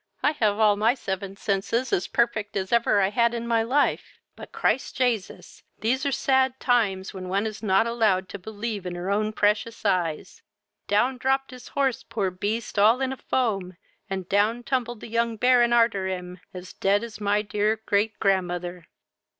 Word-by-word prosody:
I 295 - +4
have 215 -9 0
all 210 -2 +4
my 225 +4 +3
seven 195 -4 -5
senses 220 +5 -1
as 180 - +1
perfect 220 -4 0
as 190 -1 -3
ever 225 -3 +3
I 190 +1 +1
had 235 +1 +2
in 235 0 -4
my 230 -1 +2
life; 265 +6 0 0.2
but, - - -11
Christ 265 - 0
Jasus, 240 -6 -2 0.2
these 260 +6 0
are - - 0
sad 265 0 +1
times, 205 -7 +1
when 185 -1 -7
one 200 +3 0
is 215 -1 -5
not 195 0 +3
allowed 215 -5 +1
to 200 - -7
believe 215 +2 -5
their 180 +1 -4
own 215 +1 +1
precious 215 +2 0
eyes. 175 -6 -1 0.5
Down 245 +6 +1
dropped 270 +1 0
his 250 -1 -11
horse, 270 -3 0
poor 205 -5 -2
beast, 205 +4 -3
all 220 +5 +5
in 265 0 -1
a - - -9
foam, 195 -10 -1 0.3
and 190 -2 -4
down 215 +5 +1
tumbled 240 -3 -2
the - - -8
young 230 0 -1
Baron 245 0 +4
arter 230 -5 +3
him, 180 -1 -5
as 180 0 -9
dead 200 +2 +1
as 225 -2 -8
my 205 0 +1
my 210 - +2
dear 210 +1 0
great 210 +2 0
grandmother." 180 -3 -1
215 Hz, 185 wpm, -25 LUFS, 195-235 Hz, 0.5 s, all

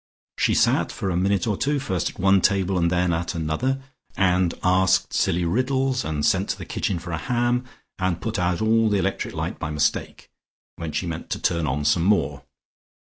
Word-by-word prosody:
She - - +2
sat - - +2
for 95 - -3
a - - -1
minute 95 +1 +1
or 105 - 0
two 145 +8 0
first 95 -10 -1
at - - -14
one 95 +1 +4
table 95 -1 +2
and 85 -1 +2
then 90 0 +1
at 85 +1 -2
another, 105 +13 -1 0.3
and 90 -2 +3
asked 95 0 +3
silly 85 +1 +1
riddles, 130 +6 0
and 75 -2 -2
sent 95 +1 +2
to - - -1
the - - -8
kitchen 95 - -2
for 85 +1 -7
a 80 - -2
ham, 120 +2 0 0.3
and 95 -2 0
put 115 -2 -3
out 90 +2 0
all 110 0 +3
the 105 - +2
electric 95 0 -2
light - - -3
by - - -3
mistake, 75 -1 -2 0.4
when 80 -2 -5
she 90 - -2
meant 85 -2 -5
to - - -2
turn 85 -2 0
on 75 +2 -1
some 75 +3 +3
more. 75 -9 +1
95 Hz, 205 wpm, -23 LUFS, 85-110 Hz, 0.4 s, one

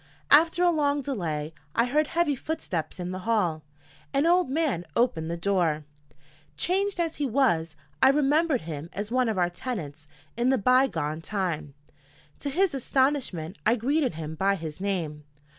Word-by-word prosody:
After 330 +4 +6
a 350 - +5
long 290 -3 +1
delay, 165 - -3 0.2
I 235 - +4
heard 295 +5 +1
heavy 330 -4 +1
footsteps 190 - -4
in 180 0 -4
the 185 - -4
hall. 185 -7 0 0.5
An 280 +3 +3
old 350 -2 +3
man 275 - 0
opened 165 -10 +1
the 170 - -2
door. 170 -5 +1 0.7
Changed 385 - 0
as 330 -2 -1
he 290 - 0
was, 215 - +1 0.3
I 265 - +7
remembered 295 0 +2
him 155 0 -6
as 205 +4 -4
one 255 -1 +2
of 215 - -1
our 175 -1 +2
tenants 160 - -6 0.3
in 240 +2 +1
the 265 - +3
by 255 +5 +4
gone 155 - -3
time. 165 -7 -3 0.6
To 285 - -3
his 365 +4 +1
astonishment, 260 - 0
I 225 +2 +4
greeted 265 - 0
him 160 -1 -5
by 195 +5 +1
his 160 -1 -7
name. 165 -7 -2
225 Hz, 165 wpm, -27 LUFS, -, 0.7 s, I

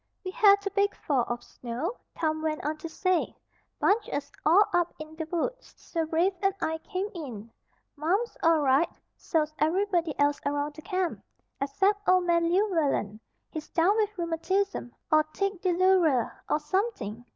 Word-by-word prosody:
"We 370 - -3
had 400 0 +5
a 400 - -1
big 400 +1 +1
fall 265 -5 0
of 240 0 -4
snow," 255 - -5 0.2
Tom 315 -1 0
went 310 -2 -2
on 305 +1 -1
to 325 +2 -7
say. 370 +2 0 0.4
"Bunged 420 +2 +2
us 285 0 -4
all 355 +8 +6
up 350 -1 +1
in 310 0 -9
the 320 0 -4
woods; - - -3
so 330 -2 -3
Rafe 345 +5 +2
and 390 -1 +2
I 320 0 -1
came 385 +2 -3
in. 235 - -7 0.4
Marm's 370 +11 0
all 325 -2 +4
right. 275 +4 +3 0.3
So's 310 -2 -1
everybody 345 -1 +1
else 285 0 +2
around 290 +1 -1
the 310 - -11
Camp, 370 -2 -2 0.4
except 390 +9 +1
Old 370 0 +5
Man 340 -1 +2
Llewellen. 325 - +1 0.3
He's 315 -2 -6
down 355 +5 +3
with 425 -2 0
rheumatism, 345 -3 -1 0.2
or 310 0 +6
tic 390 +4 -3
douloureux, 355 - +3 0.2
or 300 - +2
something. 300 - -2
330 Hz, 160 wpm, -28 LUFS, 300-385 Hz, 0.4 s, all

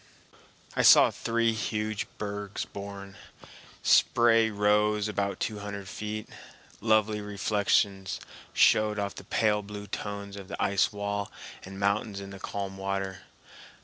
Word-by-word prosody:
I - - +2
saw - - +8
three 115 0 0
huge 110 -1 -2
bergs 105 -1 -4
born. 100 -1 -8 0.7
Spray 115 -1 +5
rose 105 0 +2
about 100 -2 -2
two 105 -1 -2
hundred 100 -1 -6
feet. 105 +2 -5 0.5
Lovely 110 -1 +2
reflections 100 -1 0 0.3
showed 105 0 +4
of 100 -1 -2
the - - -10
pale 105 -2 +1
blue 105 0 -8
tones 100 -1 -5
of 100 -2 -9
the - - -6
ice 100 -1 +2
wall 100 -1 -3 0.3
and 95 +1 -9
mountains 100 0 0
in 100 0 -8
the 100 - -9
calm 95 0 -5
water. 95 -1 -3
100 Hz, 130 wpm, -28 LUFS, 100-105 Hz, 0.7 s, saw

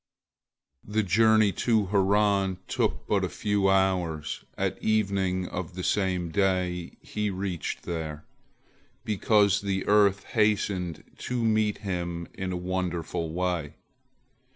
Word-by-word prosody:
The 110 +1 0
journey 110 +2 +4
to 110 +2 +1
Haran 100 -1 +2
took - - -1
but - - +1
a - - 0
few 100 -2 +1
hours, 90 -5 0
at - - -2
evening 100 -4 +1
of 90 0 -5
the 90 - -4
same 90 -4 0
day 90 -2 0
he 105 0 -2
reached 95 -3 -4
there, 80 -3 -5 0.8
because 105 -1 +3
the 95 -1 -2
earth 100 -2 +4
hastened 100 -6 0 0.2
to 125 -1 -2
meet 110 -2 +2
him 85 -2 -3
in 95 -1 -4
a 90 - -2
wonderful 90 -3 -2
way. 85 -3 -2
95 Hz, 120 wpm, -27 LUFS, 90-105 Hz, 0.8 s, journey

